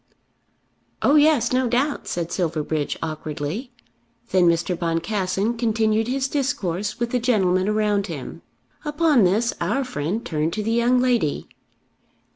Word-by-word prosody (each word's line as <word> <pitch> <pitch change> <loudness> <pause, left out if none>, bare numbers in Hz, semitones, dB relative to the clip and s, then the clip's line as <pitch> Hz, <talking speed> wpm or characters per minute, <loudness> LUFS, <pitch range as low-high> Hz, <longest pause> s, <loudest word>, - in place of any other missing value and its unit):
"Oh - - +4
yes, 295 -6 +4
no 255 0 +2
doubt," 265 +5 0
said 170 -1 -3
Silverbridge 155 -4 -1
awkwardly. 155 - -4 0.6
Then 185 -2 +4
Mr. 170 +2 +1
Boncassen 190 +6 -1
continued 220 -1 +1
his 265 +1 0
discourse 215 - -2
with 235 0 -1
the 250 - +1
gentlemen 195 -6 +2
around 210 -1 +1
him. 155 -7 -7 0.4
Upon 295 - +3
this 220 +6 +2
our 210 +11 0
friend 215 - -3
turned 155 +1 -1
to 215 - -2
the 225 - -1
young 235 +2 +3
lady. 245 - 0
215 Hz, 130 wpm, -23 LUFS, 170-245 Hz, 0.6 s, Oh